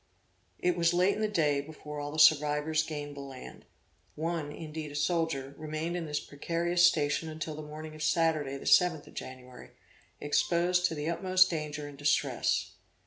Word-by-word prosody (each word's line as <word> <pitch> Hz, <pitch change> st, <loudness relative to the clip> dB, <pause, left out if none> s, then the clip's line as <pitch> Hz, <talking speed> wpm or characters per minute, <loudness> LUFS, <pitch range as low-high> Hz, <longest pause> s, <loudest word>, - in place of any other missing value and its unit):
It 180 Hz, 0 st, +1 dB
was 170 Hz, 0 st, +2 dB
late 185 Hz, +3 st, +4 dB
in 215 Hz, -, -4 dB
the 215 Hz, -, +2 dB
day 150 Hz, -8 st, +1 dB
before 150 Hz, 0 st, -9 dB
all 145 Hz, 0 st, -4 dB
the 155 Hz, -, -6 dB
survivors 150 Hz, 0 st, +4 dB
gained 145 Hz, -2 st, -6 dB
the -, -, -8 dB
land; 135 Hz, -2 st, -10 dB, 0.5 s
one 160 Hz, -2 st, -3 dB
indeed 155 Hz, 0 st, -7 dB
a -, -, -9 dB
soldier, 150 Hz, -3 st, -1 dB
remained 155 Hz, +2 st, -3 dB
in 170 Hz, -2 st, -3 dB
this 150 Hz, 0 st, -1 dB
precarious 170 Hz, +4 st, -1 dB
station 155 Hz, -1 st, 0 dB
until 155 Hz, 0 st, -5 dB
the 155 Hz, -, -7 dB
morning 155 Hz, +1 st, -8 dB
of 155 Hz, -, -10 dB
Saturday 155 Hz, -3 st, +1 dB
the -, -, -11 dB
7th 170 Hz, -4 st, +4 dB
of -, -, -15 dB
January; 130 Hz, -1 st, -9 dB, 0.5 s
exposed 175 Hz, +4 st, +2 dB
to 165 Hz, -, -5 dB
the 150 Hz, 0 st, -4 dB
utmost 185 Hz, +2 st, +3 dB
danger 150 Hz, -2 st, -4 dB
and 145 Hz, -1 st, -12 dB
distress. 145 Hz, 0 st, +1 dB
155 Hz, 175 wpm, -30 LUFS, 145-170 Hz, 0.5 s, late